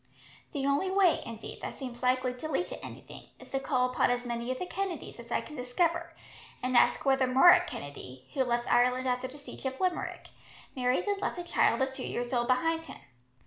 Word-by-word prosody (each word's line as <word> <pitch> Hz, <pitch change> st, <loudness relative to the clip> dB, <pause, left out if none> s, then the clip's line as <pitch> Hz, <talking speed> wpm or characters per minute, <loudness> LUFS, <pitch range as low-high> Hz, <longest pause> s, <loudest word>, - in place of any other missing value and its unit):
The 275 Hz, -3 st, -2 dB
only 280 Hz, +7 st, +2 dB
way, 380 Hz, -3 st, +4 dB
indeed, 230 Hz, -1 st, -8 dB
that -, -, -5 dB
seems 250 Hz, -3 st, -7 dB
likely 255 Hz, 0 st, +2 dB
to 280 Hz, +5 st, -6 dB
lead 315 Hz, +5 st, 0 dB
to -, -, -8 dB
anything -, -, -10 dB
is -, -, -14 dB
to 270 Hz, -, 0 dB
call 255 Hz, -2 st, +1 dB
upon 250 Hz, -, +2 dB
as 245 Hz, 0 st, 0 dB
many 235 Hz, 0 st, -3 dB
of 255 Hz, -, -2 dB
the 365 Hz, -, -3 dB
Kennedys 360 Hz, -8 st, -4 dB
as 235 Hz, 0 st, -11 dB
I -, -, +1 dB
can 300 Hz, -, -10 dB
discover, 335 Hz, +7 st, -1 dB, 0.5 s
and 255 Hz, 0 st, 0 dB
ask 240 Hz, +4 st, +4 dB
whether 265 Hz, -1 st, +3 dB
Murroch 350 Hz, +7 st, +7 dB
Kennedy, 140 Hz, -, -8 dB
who 270 Hz, -3 st, +2 dB
left 240 Hz, -1 st, 0 dB
Ireland 250 Hz, +1 st, +3 dB
after 250 Hz, 0 st, 0 dB
the 265 Hz, +3 st, -6 dB
siege 280 Hz, -1 st, -7 dB
of 265 Hz, 0 st, -5 dB
Limerick, 365 Hz, -1 st, -2 dB, 0.5 s
married 250 Hz, 0 st, +1 dB
and 405 Hz, -1 st, -1 dB
left -, -, -2 dB
a 350 Hz, -, -4 dB
child 345 Hz, -, +2 dB
of 265 Hz, -, -1 dB
two 265 Hz, -, -6 dB
years 245 Hz, +1 st, -3 dB
old 240 Hz, -1 st, +1 dB
behind 325 Hz, +6 st, +1 dB
him. -, -, -9 dB
260 Hz, 215 wpm, -30 LUFS, 245-325 Hz, 0.5 s, Murroch